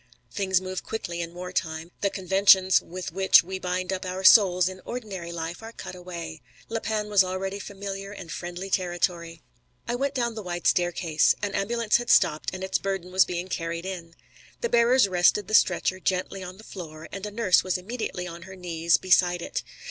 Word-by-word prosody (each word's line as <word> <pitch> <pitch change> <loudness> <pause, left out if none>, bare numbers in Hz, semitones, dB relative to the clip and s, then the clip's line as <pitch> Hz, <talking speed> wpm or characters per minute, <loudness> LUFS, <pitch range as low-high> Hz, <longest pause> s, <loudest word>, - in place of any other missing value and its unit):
Things 190 -2 +1
move 185 0 -5
quickly 175 -6 -4
in 170 0 -5
war 180 0 -6
time. 165 -2 -3
The 200 - +2
conventions 190 0 +4
with 180 -1 -7
which 190 +1 +5
we 190 +2 -5
bind 185 +1 -2
up 185 - -4
our 185 +1 -4
souls 185 -3 +7
in 185 0 -6
ordinary 200 -8 -6
life 170 +2 -5
are 225 0 -8
cut - - -8
away. 170 -3 -8 0.3
La 225 0 -2
Panne 215 -1 -2
was 205 -2 +5
already 190 +2 -3
familiar 195 0 -6
and 180 -5 -9
friendly 175 +3 -6
territory. 175 -2 -1 0.4
I 240 - -1
went 275 +3 -1
down 235 -2 0
the 220 - -6
wide 175 -2 -5
staircase. 175 -3 +2
An 205 -1 -1
ambulance 230 +2 +1
had 240 0 -6
stopped 150 - +3
and 185 0 -6
its 190 - 0
burden 195 -2 -3
was 185 0 +5
being 180 0 -4
carried 170 -1 -4
in. 170 -3 -7 0.5
The 475 - -1
bearers 235 - +4
rested 185 +2 +3
the - - -6
stretcher 185 -2 +3
gently 185 +1 -2
on 185 +1 -8
the 215 - -14
floor, 160 -6 -9
and 195 - -7
a - - -5
nurse 205 -4 +3
was 185 -1 0
immediately 185 -2 -5
on 170 -1 -8
her 190 - -9
knees 170 -2 +1
beside 175 -1 +3
it. - - -3
185 Hz, 195 wpm, -26 LUFS, 175-195 Hz, 0.5 s, souls